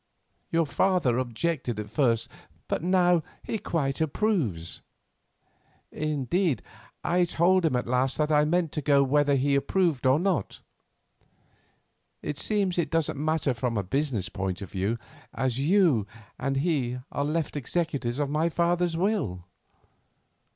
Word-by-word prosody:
Your 165 -1 +2
father 155 -7 +2
objected 125 -1 -2
at 105 -1 -6
first, 115 -4 +2 0.4
but - - -1
now 180 -1 +3 0.2
he 220 - -3
quite 145 -6 -1
approves; 145 - -1 1.1
indeed, 155 +2 0 0.4
I 175 +1 +2
told 175 +1 +3
him 130 - 0
at 125 - 0
last 125 +2 0
that 150 0 +1
I 150 0 +5
meant 170 0 +1
to 150 - -3
go 140 0 +4
whether 145 +1 +3
he 140 +1 +1
approved 145 -2 +1
or 130 +3 +4
not. 180 - -1 1.6
It 145 - -3
seems 195 -4 +1
it 170 - 0
doesn't 160 -3 0
matter 155 -3 +1
from 115 -1 -2
a 100 - 0
business 125 -1 -1
point 95 -1 -3
of 95 - -10
view, 100 +4 -1 0.4
as 130 -1 -1
you 155 - +3 0.3
and 135 +1 -1
he 135 -5 0
are 140 - -1
left 155 +1 -1
executors 140 -3 -2
of 145 -1 0
my 155 +4 +1
father's 170 0 +1
will. 170 - -1
145 Hz, 140 wpm, -27 LUFS, 125-170 Hz, 1.6 s, I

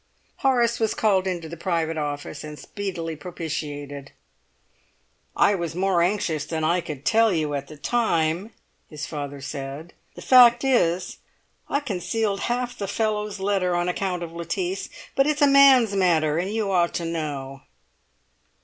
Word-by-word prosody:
Horace 240 -4 +2
was 220 -1 0
called 195 -3 +2
into 175 -3 -3
the 165 - -7
private 165 -2 -1
office 145 -2 -4
and 150 0 -8
speedily 170 -5 -5
propitiated. 145 -4 -6 1.2
"I 205 - +4
was 170 -4 -3
more 185 -1 +2
anxious 170 -5 0
than 160 +1 -3
I 170 +3 +2
could 150 -5 -8
tell 225 0 +4
you 155 -4 -1
at 140 -1 -3
the 155 - -11
time," 175 -1 0 0.4
his 150 -2 -6
father 145 -2 -6
said; 140 +4 -7 0.2
"the - - -10
fact 240 -1 +7
is, 185 -9 +1 0.5
I 285 - 0
concealed 210 -3 -2
half 245 0 -1
the 200 -4 -4
fellow's 210 -1 -2
letter 190 -2 0
on 175 0 0
account 180 -1 -2
of 165 - -7
Lettice. 350 - -3 0.3
But 275 +1 +3
it's 300 0 +1
a - - +9
man's 275 -6 +6
matter, 165 -5 +2
and 185 +3 -2
you 215 -2 -1
ought 175 -2 +2
to 170 - -2
know." 145 -5 -4
175 Hz, 155 wpm, -24 LUFS, 155-215 Hz, 1.2 s, a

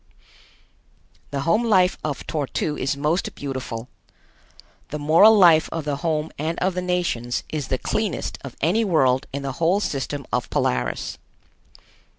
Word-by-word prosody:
The 140 -1 -3
home 215 +11 +2
life 190 -5 +3
of 145 -3 -4
Tor 150 -3 -2
tu 150 +3 -2
is 140 +1 -2
most 155 +5 -1
beautiful. 130 -4 -5 1.0
The 150 - -4
moral 165 +9 +6
life 170 -5 +6
of 165 -2 -4
the 145 -2 -1
home 155 0 -1
and 160 +3 -2
of 185 +1 0
the 180 - -2
nations 175 -10 -1
is 150 -4 -3
the 130 - 0
cleanest 210 - -2
of 135 -3 -8
any 185 +9 +2
world 135 - +2
in 140 +1 -4
the 135 - -2
whole 175 +5 +3
system 140 -5 -3
of - - -1
Polaris. 60 -1 -1
155 Hz, 155 wpm, -23 LUFS, 140-180 Hz, 1.0 s, moral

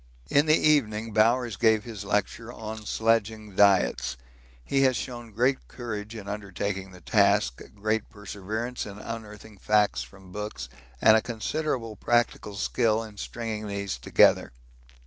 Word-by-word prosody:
In 145 +2 +4
the 155 +1 +6
evening 115 -8 +2
Bowers 115 0 +3
gave 110 -2 +3
his 110 -4 -7
lecture 105 +3 -1
on 110 -2 -7
sledging 110 -2 0
diets. 95 -10 +3 0.5
He 135 - +1
has 130 -3 +3
shown 120 -2 -6
great 125 +5 +1
courage 110 -3 -6
in 105 -3 -8
undertaking 100 -1 -4
the 90 -1 -14
task, 100 - +2
great 110 +1 -1
perseverance 105 +3 -5
in 100 -1 -9
unearthing 105 -2 -8
facts 105 -12 +2
from 90 +10 -12
books, 105 -11 -5 0.3
and 110 - +8
a 110 - +4
considerable 120 0 -3
practical 120 -3 0
skill 115 +2 +1
in 105 -2 -11
stringing 110 -1 -5
these 100 -8 -3
together. - - +4
110 Hz, 140 wpm, -27 LUFS, 100-115 Hz, 0.5 s, and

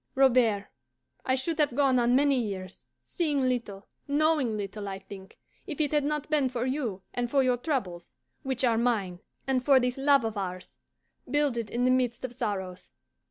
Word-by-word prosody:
Robert, 240 -6 +3 0.6
I 260 - +2
should 315 +5 -2
have 290 -5 +2
gone 270 -3 +3
on 240 +1 +3
many 280 -1 +3
years, 190 -4 -6 0.2
seeing 300 -6 0
little, 235 -6 -2 0.2
knowing 290 -6 +2
little, 205 0 -5
I 195 -1 -4
think, 195 0 -12 0.3
if 310 - -6
it 295 -2 +1
had 295 -1 +2
not 300 0 -2
been 295 -4 +1
for 245 -1 -2
you 250 -8 -3
and 245 -1 -2
for 275 +1 +3
your 250 -1 +2
troubles, 205 - -3 0.3
which 265 -1 -2
are 230 -3 +3
mine, 205 -7 0 0.3
and 260 -2 0
for 275 -1 +6
this 250 +1 -1
love 275 -3 +4
of 220 -1 -3
ours, 185 -1 -6 0.5
builded 260 -6 0
in 245 +3 0
the 255 - +4
midst 250 -1 0
of 250 - -7
sorrows. 190 -6 -4
250 Hz, 180 wpm, -28 LUFS, 210-275 Hz, 0.6 s, for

